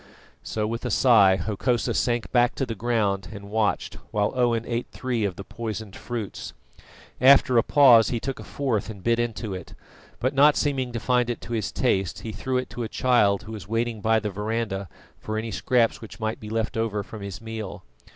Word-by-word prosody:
So 105 Hz, -1 st, -2 dB
with 115 Hz, +2 st, -3 dB
a 125 Hz, -, -2 dB
sigh 110 Hz, -7 st, +5 dB
Hokosa 110 Hz, +6 st, -1 dB
sank 120 Hz, -2 st, 0 dB
back 120 Hz, +1 st, +3 dB
to 135 Hz, -, -1 dB
the 115 Hz, -, -4 dB
ground 105 Hz, -4 st, 0 dB
and 100 Hz, -1 st, -9 dB
watched 110 Hz, -2 st, 0 dB
while 105 Hz, 0 st, 0 dB
Owen 120 Hz, -2 st, +1 dB
ate 120 Hz, 0 st, -2 dB
three 125 Hz, -4 st, -2 dB
of 95 Hz, -3 st, -2 dB
the 100 Hz, -, -7 dB
poisoned 110 Hz, -2 st, -6 dB
fruits. 115 Hz, -5 st, -6 dB, 0.7 s
After 130 Hz, -1 st, +6 dB
a 115 Hz, -, +7 dB
pause, 125 Hz, -4 st, +6 dB
he 120 Hz, -, -1 dB
took 135 Hz, +2 st, -4 dB
a -, -, -7 dB
fourth 115 Hz, -7 st, -2 dB
and 100 Hz, -4 st, -9 dB
bit 115 Hz, 0 st, +2 dB
into 115 Hz, -3 st, -2 dB
it, 90 Hz, -2 st, -8 dB, 0.4 s
but 130 Hz, +3 st, 0 dB
not 145 Hz, +2 st, +6 dB
seeming 135 Hz, -4 st, 0 dB
to 115 Hz, -, -2 dB
find 125 Hz, 0 st, +1 dB
it 120 Hz, -, -2 dB
to 120 Hz, -, -7 dB
his 110 Hz, -3 st, -1 dB
taste, 95 Hz, -8 st, 0 dB
he 110 Hz, -, -5 dB
threw 125 Hz, +5 st, -2 dB
it 130 Hz, -, -3 dB
to 120 Hz, -, -6 dB
a 115 Hz, -, -3 dB
child 105 Hz, -6 st, +3 dB
that -, -, -12 dB
was 105 Hz, -5 st, -7 dB
waiting 115 Hz, 0 st, -1 dB
by 110 Hz, +1 st, +3 dB
the 105 Hz, -1 st, -4 dB
verandah 105 Hz, -2 st, -3 dB, 0.3 s
for 110 Hz, 0 st, -4 dB
any 110 Hz, +1 st, -3 dB
scraps 115 Hz, +2 st, +1 dB
which 105 Hz, -3 st, -10 dB
might 110 Hz, +1 st, -2 dB
be 105 Hz, -, -8 dB
left 110 Hz, 0 st, -2 dB
over 110 Hz, -2 st, -1 dB
from 110 Hz, +1 st, -10 dB
his 100 Hz, -2 st, -6 dB
meal. 110 Hz, -3 st, -7 dB
115 Hz, 210 wpm, -25 LUFS, 105-120 Hz, 0.7 s, a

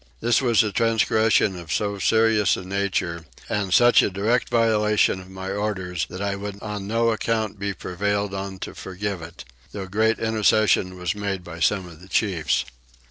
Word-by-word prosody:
This 120 Hz, +1 st, +2 dB
was 120 Hz, -5 st, +4 dB
a 105 Hz, -, -2 dB
transgression 110 Hz, -1 st, +2 dB
of 85 Hz, -3 st, -8 dB
so 100 Hz, -1 st, -1 dB
serious 110 Hz, -1 st, +3 dB
a -, -, -7 dB
nature 95 Hz, -4 st, -2 dB, 0.2 s
and 100 Hz, -2 st, -2 dB
such 120 Hz, +6 st, +6 dB
a -, -, +1 dB
direct 105 Hz, +6 st, 0 dB
violation 105 Hz, -4 st, +2 dB
of 95 Hz, 0 st, -12 dB
my 95 Hz, 0 st, -6 dB
orders 95 Hz, -5 st, -2 dB
that 95 Hz, +3 st, -6 dB
I 100 Hz, -1 st, -1 dB
would 100 Hz, 0 st, -6 dB
on 105 Hz, -2 st, -5 dB
no 115 Hz, +2 st, +2 dB
account 110 Hz, -2 st, -1 dB
be 100 Hz, 0 st, -2 dB
prevailed 100 Hz, +2 st, -2 dB
on 95 Hz, 0 st, -5 dB
to -, -, -9 dB
forgive 95 Hz, -1 st, -5 dB
it, 85 Hz, -3 st, -10 dB, 0.3 s
though 100 Hz, -2 st, -5 dB
great 110 Hz, +4 st, +1 dB
intercession 110 Hz, -4 st, +2 dB
was 90 Hz, -2 st, -2 dB
made 100 Hz, -3 st, -3 dB
by 85 Hz, -1 st, -9 dB
some 95 Hz, +4 st, +1 dB
of 85 Hz, -1 st, -14 dB
the 95 Hz, -, -13 dB
chiefs. 95 Hz, -8 st, 0 dB
100 Hz, 180 wpm, -23 LUFS, 95-110 Hz, 0.3 s, such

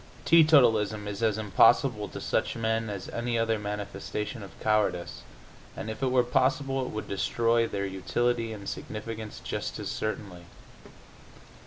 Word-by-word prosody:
Teetotalism 115 Hz, -11 st, +5 dB
is 100 Hz, 0 st, -5 dB
as 110 Hz, -2 st, +2 dB
impossible 105 Hz, +2 st, +3 dB
to -, -, -7 dB
such -, -, -1 dB
men 110 Hz, 0 st, -1 dB
as 100 Hz, -2 st, -5 dB
any 120 Hz, 0 st, -2 dB
other 115 Hz, -1 st, +1 dB
manifestation 105 Hz, +2 st, -4 dB
of 100 Hz, -, -12 dB
cowardice, 100 Hz, -5 st, 0 dB, 0.6 s
and, 110 Hz, -, -4 dB
if 110 Hz, -, -8 dB
it 135 Hz, -, +2 dB
were 125 Hz, -1 st, +4 dB
possible, 135 Hz, +2 st, +1 dB
it 125 Hz, -, -4 dB
would 110 Hz, -, -5 dB
destroy 115 Hz, +3 st, +1 dB
their 100 Hz, -2 st, -3 dB
utility 115 Hz, +5 st, -1 dB
and 100 Hz, -2 st, -8 dB
significance 110 Hz, 0 st, -6 dB
just -, -, -3 dB
as -, -, -4 dB
certainly. 100 Hz, -5 st, -4 dB
110 Hz, 145 wpm, -28 LUFS, 105-120 Hz, 0.6 s, Teetotalism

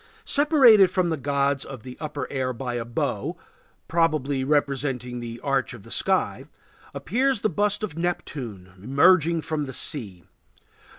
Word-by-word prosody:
Separated 265 Hz, -, +6 dB
from 180 Hz, -2 st, 0 dB
the -, -, +1 dB
gods 140 Hz, -1 st, 0 dB
of 130 Hz, -5 st, -9 dB
the 125 Hz, -1 st, -9 dB
upper 145 Hz, -3 st, -4 dB
air 130 Hz, -2 st, -2 dB
by 125 Hz, 0 st, -5 dB
a 120 Hz, -1 st, -2 dB
bow, 115 Hz, -, -3 dB, 0.5 s
probably 155 Hz, -5 st, +1 dB
representing 135 Hz, -3 st, -1 dB
the 120 Hz, 0 st, -7 dB
arch 135 Hz, -3 st, -1 dB
of 110 Hz, -, -13 dB
the -, -, -14 dB
sky, -, -, 0 dB, 0.5 s
appears 255 Hz, +2 st, 0 dB
the 215 Hz, -, +1 dB
bust 205 Hz, +4 st, 0 dB
of 190 Hz, -8 st, -4 dB
Neptune, 125 Hz, -, -5 dB
emerging 160 Hz, -, +3 dB
from 155 Hz, -2 st, -2 dB
the 130 Hz, -, -8 dB
sea. 100 Hz, -, 0 dB
140 Hz, 150 wpm, -24 LUFS, 125-175 Hz, 0.5 s, Separated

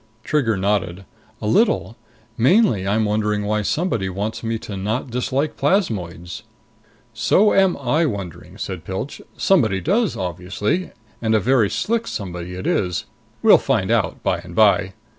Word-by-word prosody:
Trigger 120 Hz, -9 st, +1 dB
nodded. 95 Hz, -1 st, -1 dB, 0.4 s
"A -, -, -1 dB
little. 205 Hz, -, +2 dB, 0.4 s
Mainly 130 Hz, -, +3 dB
I'm 110 Hz, +2 st, +2 dB
wondering 105 Hz, 0 st, 0 dB
why 105 Hz, +1 st, 0 dB
somebody 115 Hz, -, -1 dB
wants 100 Hz, +4 st, -4 dB
me 115 Hz, 0 st, -1 dB
to 105 Hz, -2 st, -7 dB
not 110 Hz, +6 st, -3 dB
dislike 130 Hz, +4 st, -1 dB
plasmoids." 95 Hz, -, -1 dB, 0.7 s
"So 120 Hz, -, +3 dB
am 190 Hz, -2 st, +3 dB
I 145 Hz, +5 st, +1 dB
wondering," 100 Hz, -, -6 dB
said 95 Hz, -4 st, -5 dB
Pilch. 95 Hz, +9 st, -5 dB, 0.2 s
"Somebody 115 Hz, -, +3 dB
does, 200 Hz, -, +1 dB
obviously. 95 Hz, -, -2 dB, 0.3 s
And 110 Hz, -1 st, +2 dB
a -, -, +4 dB
very 115 Hz, -1 st, +3 dB
slick 230 Hz, +1 st, -1 dB
somebody 90 Hz, -2 st, -5 dB
it 95 Hz, -, -6 dB
is. 90 Hz, -3 st, 0 dB, 0.4 s
We'll -, -, +7 dB
find -, -, 0 dB
out -, -, 0 dB
by -, -, +1 dB
and -, -, -11 dB
by. -, -, +4 dB
110 Hz, 145 wpm, -21 LUFS, 95-145 Hz, 0.7 s, We'll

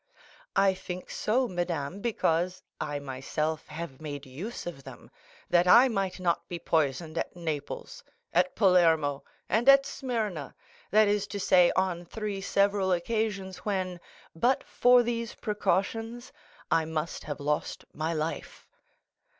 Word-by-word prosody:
"I 195 Hz, -1 st, +4 dB
think 185 Hz, -1 st, -7 dB
so, 250 Hz, +4 st, +1 dB
madame, 175 Hz, -2 st, -3 dB
because 185 Hz, -5 st, 0 dB, 0.2 s
I 145 Hz, -, -2 dB
myself 145 Hz, +3 st, -3 dB
have 155 Hz, -3 st, -7 dB
made 145 Hz, -2 st, -6 dB
use 165 Hz, -, -7 dB
of 165 Hz, -6 st, -7 dB
them, -, -, -12 dB, 0.4 s
that 175 Hz, 0 st, +4 dB
I 245 Hz, +8 st, +8 dB
might 195 Hz, -4 st, -2 dB
not 175 Hz, -2 st, 0 dB
be 175 Hz, -, -4 dB
poisoned 160 Hz, 0 st, 0 dB
at -, -, -4 dB
Naples, 160 Hz, -5 st, -5 dB, 0.3 s
at 180 Hz, +2 st, +2 dB
Palermo, 165 Hz, -8 st, +3 dB, 0.2 s
and 235 Hz, +5 st, +3 dB
at 275 Hz, 0 st, +8 dB
Smyrna—that 215 Hz, -, -1 dB
is 205 Hz, 0 st, +1 dB
to 200 Hz, -, -5 dB
say, 180 Hz, -2 st, +5 dB
on 185 Hz, -2 st, 0 dB
three 205 Hz, +1 st, -4 dB
several 200 Hz, -1 st, +2 dB
occasions 195 Hz, 0 st, -1 dB
when, 185 Hz, -3 st, -2 dB, 0.4 s
but 245 Hz, +10 st, +2 dB
for 245 Hz, 0 st, +5 dB
these 235 Hz, -1 st, -3 dB
precautions, 225 Hz, +4 st, -1 dB, 0.4 s
I 160 Hz, -, +3 dB
must 160 Hz, +1 st, -4 dB
have 145 Hz, -1 st, -5 dB
lost 150 Hz, +1 st, -2 dB
my 155 Hz, +2 st, -2 dB
life." 160 Hz, 0 st, -4 dB
180 Hz, 135 wpm, -28 LUFS, 160-210 Hz, 0.4 s, I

